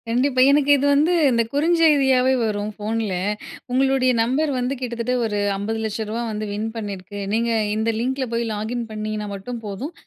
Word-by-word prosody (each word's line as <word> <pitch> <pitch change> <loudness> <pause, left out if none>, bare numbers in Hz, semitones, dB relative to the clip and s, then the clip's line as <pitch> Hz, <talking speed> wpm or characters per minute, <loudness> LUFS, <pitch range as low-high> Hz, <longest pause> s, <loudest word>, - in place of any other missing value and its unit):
கண்டிப்பா. 255 +3 +2
எனக்கு 290 0 +3
இது 280 - 0
வந்து 300 +5 +3 0.2
இந்த 235 -1 +3
குறுஞ்செய்தியாவே 285 -5 +4
வரும் 210 -1 -2
ஃபோன்ல. 215 -1 -2 0.6
உங்களுடைய 265 0 +3
நம்பர் 275 +6 +1
வந்து 250 +2 -1
கிட்டத்தட்ட 240 -1 -2
ஒரு 210 -2 -1 0.2
ரூ.50,00,000 220 +1 -3
வந்து 215 0 -3
வின் 215 +2 -2
பண்ணியிருக்கு. 205 -2 -6
நீங்க 230 +1 +1 0.3
இந்த 220 +1 0
லிங்க்குல 250 -1 -1
லாகின் 225 +3 -3
பண்ணிங்கன்னா 215 0 -4
மட்டும் 235 +5 -6
போதும். 225 - -5
235 Hz, 145 wpm, -22 LUFS, 215-265 Hz, 0.6 s, குறுஞ்செய்தியாவே